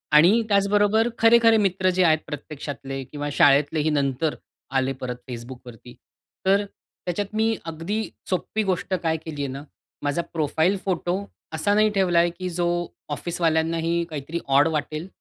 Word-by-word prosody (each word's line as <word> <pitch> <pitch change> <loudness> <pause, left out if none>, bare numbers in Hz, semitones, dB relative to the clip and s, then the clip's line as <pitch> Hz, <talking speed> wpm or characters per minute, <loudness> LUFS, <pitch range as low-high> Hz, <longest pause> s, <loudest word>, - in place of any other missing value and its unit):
आणि 180 +10 +6
त्याचबरोबर 205 +2 +3
खरे-खरे 230 0 +6
मित्र 190 -2 +2
जे 185 0 +2
आहेत 160 -2 +4
प्रत्यक्षातले 140 -2 -6
किंवा 145 +2 -5
शाळेतलेही 145 +3 +4
नंतर 145 +1 0 0.4
आले 135 +1 0
परत 125 -1 -3
Facebookवरती. 120 0 -9 0.5
तर 200 +2 +3 0.4
त्याच्यात 200 +4 -3
मी 225 +1 +2
अगदी 165 +7 -3 0.3
सोपी 205 +4 -1
गोष्ट 190 0 -1
काय 160 -1 +1
केली 150 -3 -5
आहे - - -1
ना, 135 +2 -7 0.4
माझा 145 +4 0
प्रोफाइल 160 +4 +1
फोटो 185 +1 -1 0.3
असा 180 +6 +1
नाही 215 +1 +4
ठेवलाय 175 -3 +3
की 180 +2 -5
जो 175 0 -1 0.5
ऑफिसवाल्यांनाही 165 +1 0
काहीतरी 155 +2 -4
ऑड 140 +3 +5
वाटेल 155 +1 -3
165 Hz, 140 wpm, -24 LUFS, 145-195 Hz, 0.5 s, आणि